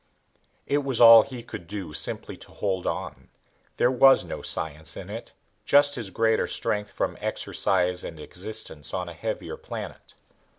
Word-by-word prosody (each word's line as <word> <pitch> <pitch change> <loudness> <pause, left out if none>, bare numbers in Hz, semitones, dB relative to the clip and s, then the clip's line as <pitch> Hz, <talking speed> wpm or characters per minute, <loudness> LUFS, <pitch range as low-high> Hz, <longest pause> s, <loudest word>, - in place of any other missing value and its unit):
It 145 - +1
was 135 -4 -2
all 115 -1 +10
he 125 -1 -8
could 85 -7 -9
do 95 -5 -6
simply - - -2
to - - -11
hold 95 -3 -2
on. - - -5 0.5
There 125 - +3
was 135 +1 +6
no - - -6
science 80 +1 -3
in 95 +1 -8
it, 115 +2 -8 0.3
just 145 +6 +4
his 115 -7 -4
greater 110 +3 +1
strength 105 -1 -2
from - - -3
exercise 90 -1 0
and 80 - -8
existence 90 -4 -3
on 90 -1 -3
a - - -8
heavier 80 - -5
planet. - - -9
105 Hz, 160 wpm, -26 LUFS, 90-120 Hz, 0.5 s, all